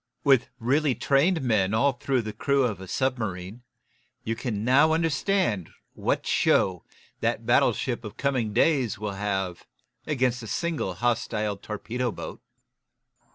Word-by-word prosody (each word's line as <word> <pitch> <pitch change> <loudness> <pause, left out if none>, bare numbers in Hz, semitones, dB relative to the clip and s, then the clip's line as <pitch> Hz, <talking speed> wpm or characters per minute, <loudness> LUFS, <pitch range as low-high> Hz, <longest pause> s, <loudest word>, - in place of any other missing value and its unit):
With 135 -4 +4
really 135 +3 +1
trained 145 - +2
men 110 -4 +2
all 140 +5 +3
through 125 0 -1
the 110 -1 -5
crew 140 +5 +1
of 105 -6 -1
a 95 - -8
submarine, 110 -4 -2 0.6
you 115 0 -2
can 110 -3 -3
now 145 +6 +5
understand 165 - 0 0.2
what - - -1
show 90 -3 +2 0.4
the - - +1
battleship - - +1
of - - -8
coming 130 -6 0
days 125 -1 +2
will 105 -1 -4
have 95 -3 -3 0.4
against 125 -4 0
a 115 - -8
single 150 - -2
hostile 110 -1 -1
torpedo 115 +4 -4
boat. - - -8
120 Hz, 135 wpm, -26 LUFS, 105-140 Hz, 0.6 s, now